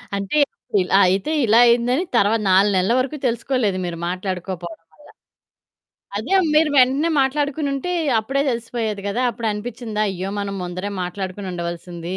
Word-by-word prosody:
అంటే, 200 +8 -2 0.2
అప్పుడిల్ 200 -7 -2
అయితే 190 +10 +1
ఇలా 225 +1 +5
అయిందని, 245 +6 +3
తర్వాత 220 0 +3
నాలునెల్ల 190 +1 +3
వరకు 275 +4 -2
తెలుసుకోలేదు 235 -4 0
మీరు 170 -1 -4
మాట్లాడుకోపోడం 185 0 -5
వల్ల. 165 - -39 1.3
అదే 245 - -1 0.2
మీరు 305 0 +4
వెంటనే 265 +5 +4
మాట్లాడుకునుంటే, 285 +3 -1 0.3
అప్పుడే 270 +6 -1
తెలిసిపోయేది 230 -3 -3
గదా! 225 +5 -1
అప్పుడు 230 0 -3
అనిపిచ్చిందా, 215 0 -4
అయ్యో! 190 +1 -4
మనం 200 -1 -4
ముందరే 180 +3 -4
మాట్లాడుకొనుండవలసింది, 180 -2 -5
210 Hz, 125 wpm, -21 LUFS, 185-250 Hz, 1.3 s, ఇలా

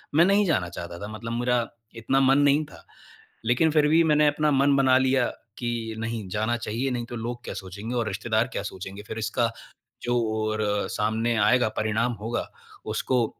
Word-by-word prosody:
मैं 165 +3 +7
नहीं 200 +2 +4
जाना 130 - +1
चाहता 85 0 -7
था, 100 - -6
मतलब 110 +2 -6
मेरा 120 -1 +1 0.3
इतना 115 +4 +1
मन 135 0 +5
नहीं 145 +1 +4
था। 150 - -15 0.6
लेकिन 125 +7 +3
फिर 150 -1 +4
भी 160 +2 +5
मैंने 150 -1 +4
अपना 150 +1 +1
मन 140 +1 +4
बना 130 -2 +5
लिया 130 -1 +2 0.3
कि 120 -2 -3
नहीं 115 -2 -3
जाना 110 +5 0
चाहिए 120 +3 -2
नहीं 120 -1 -2
तो 120 - -6
लोग 120 +1 -5
क्या - - -5
सोचेंगे 100 +5 -6
और 120 -2 0
रिश्तेदार 110 +4 0
क्या - - -2
सोचेंगे। 95 0 -7
फिर 110 - -5
इसका 115 +2 0 0.5
जो 120 - 0 0.2
और 110 0 -1 0.3
सामने 110 +2 0
आएगा 120 +2 +4
परिणाम 110 +3 +1
होगा 115 +3 -2 0.5
उसको 120 +1 +1
120 Hz, 185 wpm, -26 LUFS, 110-135 Hz, 0.6 s, मैं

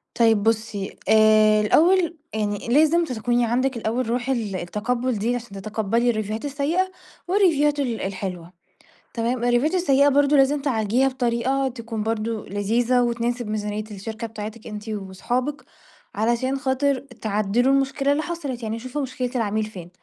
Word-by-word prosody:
طيب 225 -3 +3
بُصّي 220 -3 -1
آآ، 215 -1 +5
الأول 335 - +3 0.2
يعني 210 -1 -2
لازم 315 +7 +4
تكوني 240 -2 0
عندِك 250 +2 0
الأول 230 +2 -2
رُوح 245 +2 -1
ال 225 -7 -1
التقبُّل 235 +7 -2
دي 230 +4 0
عشان 240 0 -6
تتقبّلي 220 +3 0
الريفيوهات 215 +1 -2
السيّئة 300 +7 0 0.4
والريفيوهات 315 -7 +3
ال 245 -5 -1
الحلوة، 185 -3 -5 0.6
تمام، 235 +2 -1
الريفيوهات 245 +8 +2
السيّئة 285 -6 +4
برضه 285 +1 +4
لازم 280 +1 +3
تعالجيها 245 -1 +1
بطريقة 260 +1 0
تكون 230 -3 -5
برضه 225 0 -2
لذيذة، 230 +5 +1
وتناسب 240 0 -1
ميزانيّة 210 0 -3
الشركة 220 +3 -6
بتاعتِك 220 0 -8
أنتِ 210 0 -7
وأصحابِك، 220 +8 -3 0.5
علشان 240 +5 0
خاطِر 270 0 +1
تعدِّلوا 230 -1 0
المشكلة 275 +1 +1
اللي 295 +2 +1
حصَلِت، 285 -8 -5
يعني 220 +1 -3
شوفوا 255 +5 -4
مشكلة 255 -2 -3
العميل 215 -2 0
فين. 185 -5 -9
235 Hz, 140 wpm, -23 LUFS, 215-270 Hz, 0.6 s, آآ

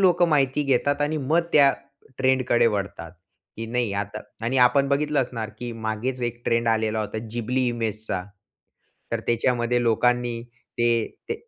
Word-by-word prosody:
लोक 180 -2 +4
माहिती 150 -4 +3
घेतात 140 +1 +1
आणि 150 +2 0
मग 155 +4 +2
त्या 140 -2 +6 0.5
ट्रेंडकडे 130 -2 +3
वळतात. 100 -6 -3 0.4
की 115 - -5
नाही 120 -2 -1
आता 105 +1 -3 0.2
आणि 130 +3 0
आपण 140 +2 +2
बघितलं 145 +1 +1
असणार 115 -4 -4
की 120 -1 -5
मागेच 120 +4 -2
एक 120 0 -3
ट्रेंड 115 0 +1
आलेला 110 -1 +1
होता, 110 +1 -4
जिबली 125 +2 -1
इमेजचा, 110 -5 -3 0.9
तर - - 0
त्याच्यामध्ये 120 +1 +1
लोकांनी 120 0 +1 0.4
ते, 120 -1 +2 0.2
ते 450 - 0
120 Hz, 145 wpm, -24 LUFS, 115-135 Hz, 0.9 s, त्या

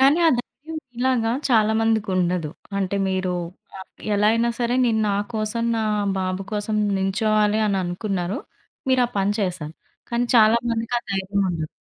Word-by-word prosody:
కానీ 275 +5 +5
ఆ - - +7
ధైర్యం 315 +6 -7
మీలాగా 245 -2 +1 0.2
చాలా 220 -3 +4
మందికి 225 -2 +1
ఉండదు. 175 -3 0 0.3
అంటే 195 0 -1
మీరు 185 -1 -1 0.5
ఆహ్, 190 - -10 0.3
ఎలా 210 +1 +3
అయిన 230 +1 +2
సరే 240 0 0
నేను 225 -2 +2
నా 200 - +1 0.2
కోసం, 220 +2 -1
నా 220 - 0 0.4
బాబు 185 +1 -2
కోసం 210 +1 -1 0.2
నించోవాలి 210 +2 +2
అని 195 -2 +1
అనుకున్నారు. 180 +1 -2 0.5
మీరా 255 -2 +4
పని 195 +1 +2
చేసారు. 175 -5 -3 0.4
కానీ 235 +1 +1
చాలా 220 +1 +6
మందికి 230 +1 -2
ఆ - - -8
ధైర్యం 195 +1 -1
ఉండదు. 160 -3 -2
215 Hz, 160 wpm, -23 LUFS, 190-230 Hz, 0.5 s, ఆ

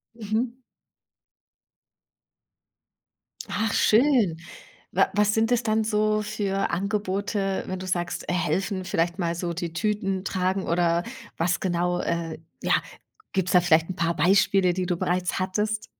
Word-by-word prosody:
Mhm. 230 +3 -2 2.9
Ach, 215 +1 -1
schön. 225 - +4 0.5
Wa - - +3
was 210 0 +3
sind 225 +2 +1
es 245 - +3
dann 220 0 +1
so 215 0 +1
für 205 -2 -1
Angebote, 195 0 -1
wenn 185 0 -4
du 185 - -6
sagst, 175 -1 -2
helfen, 185 +2 -1
vielleicht 175 +2 -1
mal 170 -1 0
so 170 0 -3
die 170 -1 -4
Tüten 195 0 -1
tragen 185 +1 0
oder 170 0 +1 0.3
was 175 +1 +1
genau 175 -1 0
äh, 165 -1 -2 0.2
ja, - - +2 0.6
gibt's 190 -2 0
da 180 - +6
vielleicht 165 -1 +3
'n 185 - -4
paar 170 -2 0
Beispiele, 185 +2 +3
die 185 0 -2
du 175 -1 -1
bereits 180 +2 -1
hattest? 210 +3 -1
190 Hz, 135 wpm, -25 LUFS, 175-210 Hz, 2.9 s, da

